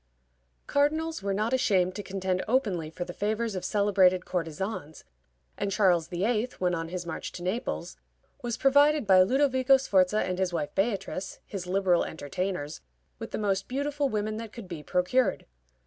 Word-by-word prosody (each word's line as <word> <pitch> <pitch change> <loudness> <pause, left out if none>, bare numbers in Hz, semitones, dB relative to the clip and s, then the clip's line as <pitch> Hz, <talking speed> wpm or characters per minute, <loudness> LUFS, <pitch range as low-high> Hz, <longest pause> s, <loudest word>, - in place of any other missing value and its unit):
Cardinals 315 +3 +1
were 200 0 -2
not 215 +5 0
ashamed 195 -8 +2
to 205 - -5
contend 185 -2 -2
openly 205 - 0
for 175 +2 -5
the 175 - -7
favors 215 +3 -1
of 185 - -4
celebrated 195 -3 +3
courtesans, 165 -1 -4 0.6
and 200 0 -1
Charles 180 -5 +3
VIII., 215 +7 0
when 180 -1 0
on 165 -1 -2
his 180 0 -5
march 165 - -5
to 175 - -7
Naples, 210 +8 -3 0.4
was 240 -1 -3
provided 285 +1 +4
by 190 -2 +7
Ludovico 260 +4 +4
Sforza 205 -5 +2
and 185 0 -3
his 190 -1 +1
wife 195 +3 -3
Beatrice, 195 -2 -2
his 185 -3 -6
liberal 185 -2 +2
entertainers, 160 0 -4 0.4
with - - -6
the - - -4
most 195 -2 0
beautiful 285 +2 -1
women 215 -1 -2
that 225 -1 -7
could 230 -4 -9
be 170 -4 -6
procured. 180 +11 +1
195 Hz, 165 wpm, -28 LUFS, 180-235 Hz, 0.6 s, by